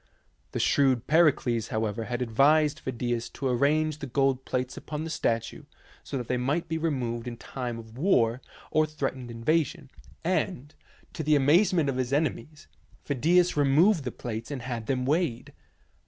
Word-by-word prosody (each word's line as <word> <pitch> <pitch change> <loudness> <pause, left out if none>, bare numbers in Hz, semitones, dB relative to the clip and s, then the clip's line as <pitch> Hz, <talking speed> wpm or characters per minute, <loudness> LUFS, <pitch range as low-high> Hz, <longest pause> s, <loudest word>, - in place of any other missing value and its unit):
The - - -3
shrewd 130 -4 +2
Pericles, 145 -8 +3
however, 110 0 -2
had 120 +1 -2
advised 145 +6 +3
Phidias 120 -2 -3
to 135 - -3
arrange 150 +4 +1
the 140 - -5
gold 135 0 +1
plates 130 0 -2
upon 150 +1 -5
the 160 - -5
statue 115 -6 -2 0.4
so 140 - -4
that 120 -2 -5
they 125 - 0
might 145 +7 -1
be 160 0 -2
removed 125 -7 -2
in 120 -1 -5
time 120 -1 -5
of 115 +1 -11
war 125 - +2 0.3
or 155 0 +3
of 155 - -13
threat 140 -3 -1
ened 125 -2 -9
invasion, 140 +4 -1 0.3
and, 165 -5 -1 0.4
to - - -4
the 155 0 +3
amazement 165 +3 +4
of 135 -2 -1
his 130 -1 -1
ene 145 -1 +2
mies, 150 +5 -14 0.4
Phidias 170 +6 +2
removed 150 +5 +4
the 125 - -3
plates 115 -1 -6
and 140 -5 -5
had 120 -3 -5
them 130 -2 0
weighed. 140 -4 -1
135 Hz, 170 wpm, -27 LUFS, 120-155 Hz, 0.4 s, amazement